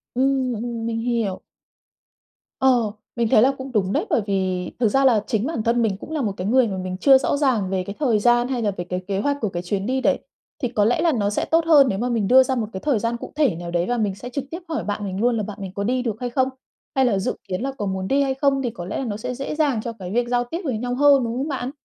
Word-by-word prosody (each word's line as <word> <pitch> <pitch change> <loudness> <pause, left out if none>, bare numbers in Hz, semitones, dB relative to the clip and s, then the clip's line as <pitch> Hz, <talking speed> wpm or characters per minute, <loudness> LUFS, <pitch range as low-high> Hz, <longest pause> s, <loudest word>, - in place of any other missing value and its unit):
Ừm, 260 0 +1
ừm, 230 0 -4
mình 230 0 -2
hiểu. 230 -5 -1 1.2
Ờ, 245 -5 +3 0.2
mình 235 -1 +1
thấy 215 - +6
là 260 +4 +5
cũng 265 0 -7
đúng 200 -4 0
đấy, - - 0
bởi - - +2
vì 185 -2 -1
thực 240 - +3
ra 270 +5 +3
là 225 -5 +4
chính 220 -2 0
bản 310 -7 -2
thân 235 +1 +2
mình 210 -4 0
cũng - - -10
là 310 -2 -1
một 215 -5 0
cái 180 - -3
người 250 +2 +4
mà 195 -3 -4
mình 185 0 -4
chưa 270 +6 +6
rõ 275 - 0
ràng 250 -10 +1
về 190 -1 -1
cái 200 +2 -7
thời 245 -8 +2
gian, 240 +2 +3
hay 255 -2 -2
là 210 -2 +1
về 180 -2 -5
cái 180 +1 -3
kế 195 -1 -1
hoạch 285 +6 0
của 215 - 0
cái 175 -1 -5
chuyến 195 +2 -2
đi 260 +3 0
đấy. - - +2 0.4
Thì - - +3
có 215 -3 +1
lẽ 240 +8 +2
là 335 -1 +3
nó 210 -7 0
sẽ 205 - -1
tốt 330 0 +2
hơn 295 -4 +6
nếu 195 - -2
mà 245 +2 -1
mình 225 -5 0
đưa 260 +3 +7
ra 260 0 -1
một 225 -4 -1
cái 190 - -4
thời 265 0 +1
gian 230 +2 -1
cụ - - -9
thể 285 - +2
nào 170 +1 -6
đấy 175 0 +1
và 245 - 0
mình 205 -4 0
sẽ 245 +5 -8
trực 275 +2 -3
tiếp 335 - -4
hỏi 315 - -2
bạn 205 0 -3
mình 190 -1 -4
luôn 240 0 +2
là 215 - -1
bạn 205 0 -7
mình 190 -2 -5
có 200 - -2
đi 250 +4 0
được 225 -4 -2
hay 245 - -3
không, 260 +2 +1 0.5
hay 265 -1 +4
là 210 -6 +2
dự 190 - -2
kiến 185 +1 -3
là 270 +2 -2
có 210 - -3
muốn 190 -1 -2
đi 275 +5 +2
hay 270 -1 +1
không, 275 0 +1
thì 250 - -1
có 215 -7 -8
lẽ 195 - -4
là 270 - -3
nó 205 -3 -3
sẽ 250 +3 -4
dễ 275 +3 -4
dàng 285 -8 +1
cho 230 +1 -5
cái 180 -1 -6
việc 240 +3 +1
giao 245 0 +2
tiếp 325 +9 -5
với 260 -8 -1
nhau 245 +2 -2
hơn, 280 -1 +5
đúng 230 -1 -2
không 270 +3 -2
bạn? 265 -3 -3
235 Hz, 310 wpm, -22 LUFS, 205-265 Hz, 1.2 s, đưa